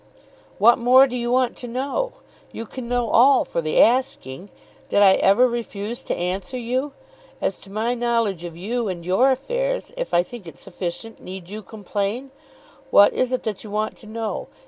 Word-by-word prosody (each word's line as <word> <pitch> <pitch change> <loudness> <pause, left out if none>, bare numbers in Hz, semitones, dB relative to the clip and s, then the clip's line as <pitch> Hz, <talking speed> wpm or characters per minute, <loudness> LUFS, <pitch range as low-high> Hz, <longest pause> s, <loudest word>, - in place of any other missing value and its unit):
"What 235 +5 +5
more 255 +3 +6
do 255 -2 -5
you 240 -1 -2
want 250 0 +2
to 245 - -7
know? 275 - -2 0.4
You 230 - -6
can 240 +1 -8
know 245 -2 0
all 265 +3 +5
for 170 - -2
the 155 -1 0
asking. 205 - +1 0.4
Did - - 0
I 200 -2 +7
ever 205 +8 +4
refuse 235 -1 -5
to - - -2
answer 185 +8 -3
you? 255 +4 -2 0.5
As 190 - -2
to 195 - -14
my 220 +4 -1
knowledge 230 -7 0
of 170 -1 -7
you 230 +5 -2
and 175 -3 -5
your 195 +9 +3
affairs, - - -2
if - - -4
I 175 - +3
think 220 -2 -11
it 150 -5 -11
sufficient, 190 +5 -7
need 185 -1 -9
you 215 +2 -6
complain? 210 +5 -4 0.6
What 205 - +6
is 255 0 0
it 255 - -1
that 215 -3 -4
you 215 - -9
want 215 +1 -2
to 220 - -14
know? 220 0 -4
230 Hz, 190 wpm, -22 LUFS, 195-250 Hz, 0.6 s, I